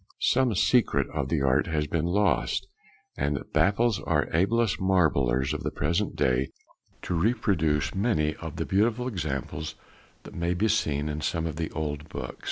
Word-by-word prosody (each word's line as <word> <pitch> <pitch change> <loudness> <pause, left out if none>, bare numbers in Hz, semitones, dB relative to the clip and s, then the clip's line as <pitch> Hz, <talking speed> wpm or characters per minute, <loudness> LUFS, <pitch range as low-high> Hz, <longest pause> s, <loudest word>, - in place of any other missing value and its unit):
Some 125 -4 +2
secret 120 +5 +3
of 70 -3 -2
the 75 -5 +1
art 65 -1 +2
has 75 -1 0
been 80 +1 -1
lost, 100 +3 +1 0.5
and 70 +1 0
it - - -10
baffles 105 +1 +3
our - - +1
ablest 105 +6 +2
marblers 70 -9 +2
of - - -4
the - - -1
present 85 +8 -1
day 65 +1 +1 0.5
to - - -2
reproduce 85 -6 +1
many 95 -7 +1
of - - -7
the - - -2
beautiful 115 +5 +1
examples 75 - -4 0.5
that - - -11
may 85 +1 -1
be 110 +5 +1
seen 75 -9 0
in 75 0 -3
some 80 +1 -1
of 80 -1 -4
the 80 -1 -2
old 75 -1 -4
books. 65 -1 -6
80 Hz, 170 wpm, -27 LUFS, 75-105 Hz, 0.5 s, secret